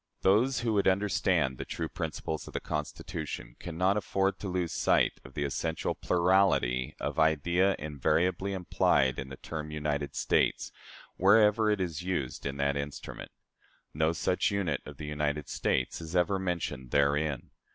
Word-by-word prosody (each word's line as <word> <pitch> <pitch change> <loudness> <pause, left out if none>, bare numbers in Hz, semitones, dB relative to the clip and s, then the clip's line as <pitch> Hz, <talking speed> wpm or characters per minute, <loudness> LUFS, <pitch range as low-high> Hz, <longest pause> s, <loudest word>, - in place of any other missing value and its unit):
Those 115 +7 +3
who 115 -2 0
would 100 -1 +2
understand 95 -9 +1
the - - -2
true 80 - -4
principles 80 -1 -4
of - - -11
the - - 0
Constitution 75 -5 -5
can 85 -2 -7
not 95 +3 +3
afford 95 -1 0
to 100 - -5
lose 90 -2 -1
sight - - +2
of 65 - -14
the 75 - -1
essential 80 +3 -2
plurality 85 -9 +2
of - - -3
idea 85 +5 +3
invariably 80 +6 0
implied 70 -7 +2
in 65 - -5
the 65 - -8
term 75 -1 -6
"United 75 -2 -2
States," - - +1 0.5
wherever 105 +2 +5
it 105 -1 +1
is 85 -4 -2
used 85 -9 -3
in 70 0 -4
that 70 0 +1
instrument. 70 0 -6 0.6
No 80 +2 +2
such 90 +2 +1
unit 100 -4 -1
as - - -8
the 75 - -7
United 75 0 -2
States 65 +5 -1
is 80 +2 -7
ever 95 +2 +2
mentioned 85 -8 -3
therein. 70 0 +1
80 Hz, 160 wpm, -30 LUFS, 70-95 Hz, 0.6 s, wherever